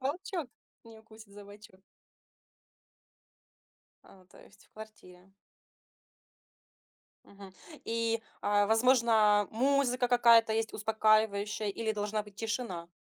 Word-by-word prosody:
волчок 310 +2 -4 0.4
не 225 -1 -15
укусит 220 -2 -17
за 205 0 -12
бочок. 205 -1 -16 2.3
А, 190 -1 -20
то 180 - -20
есть - - -21
в - - -46
квартире. 195 -4 -15 1.9
Мгм. 195 -1 -15 0.3
И, 230 0 -2 0.2
а, 205 0 +1
возможно, 225 -3 +3
музыка 255 +1 0
какая-то 235 -2 +4
есть 225 0 -2
успокаивающая, 215 -1 0
или 220 +2 -3
должна 210 0 -3
быть 205 -1 -17
тишина? 220 -6 -5
220 Hz, 100 wpm, -30 LUFS, 205-230 Hz, 2.3 s, какая-то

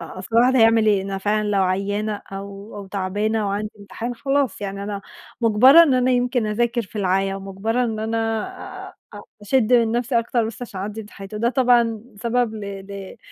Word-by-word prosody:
أ - - -9
أصل 190 +5 -4
الواحد 250 +2 +5
هيعمل 225 -1 +5
إيه 205 -3 +3
أنا 195 0 -4
فعلًا 210 +2 0
لو 200 -2 +2
عيانة 205 +3 -1
أو 200 +2 -8
أو 200 -1 -7
تعبانة 205 +3 -1
وعندي 210 +2 -2
امتحان، 225 +4 -6
خلاص، 275 +1 0
يعني 200 0 -4
أنا 200 0 -4 0.4
مجبرة 245 +8 +7
إن 290 -6 +3
أنا 255 0 +2
يمكن 245 -2 +1
أذاكر 235 +3 0
في 210 +1 -12
العيا 195 0 +1
ومجبرة 195 +5 -2
إن 220 -2 -3
أنا 220 +1 -2 0.7
آآ - - -14 0.3
أ - - -10 0.2
أشدّ 245 +1 +1
من 230 -2 +4
نَفسي 240 +1 +1
أكتر 230 0 0
بس 230 +2 -7
عشان 205 -5 -7
أعدّي 210 +3 -5
امتحاناتي، 205 -1 -10
وده 235 +3 +1
طبعًا 240 -3 +2
سبب 235 +1 0
ل 215 - -6 0.3
ل 200 -1 -8
215 Hz, 190 wpm, -22 LUFS, 200-235 Hz, 0.7 s, مجبرة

